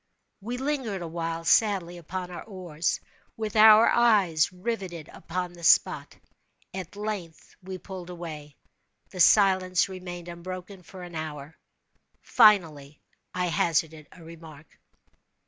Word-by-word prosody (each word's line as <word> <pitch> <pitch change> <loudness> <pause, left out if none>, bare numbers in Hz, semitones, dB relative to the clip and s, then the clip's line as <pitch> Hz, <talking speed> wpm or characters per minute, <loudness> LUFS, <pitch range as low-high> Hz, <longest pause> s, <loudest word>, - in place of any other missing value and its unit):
We 240 +5 -5
lingered 260 -9 -3
awhile 165 0 -4
sadly 190 -4 +2
upon 180 +2 -6
our 175 - -7
oars, 175 -6 -3 0.4
with 220 -1 -4
our 215 +1 +8
eyes 200 -11 +3
riveted 180 -5 -5
upon 180 +1 -5
the 170 -1 -14
spot. - - +3 0.6
At 185 0 -7
length 205 -6 -6
we 185 0 -7
pulled 185 -1 -9
away. 155 -5 -8 0.6
The 185 - -9
silence 185 -2 +4
remained 175 -2 -8
unbroken 185 +2 -8
for 180 +1 -12
an 175 -1 -10
hour. 155 -1 -7 0.7
Finally, 155 -9 +3 0.4
I 180 -1 0
hazarded 160 -1 0
a 175 - -15
remark. 160 -2 -14
180 Hz, 120 wpm, -26 LUFS, 165-195 Hz, 0.7 s, our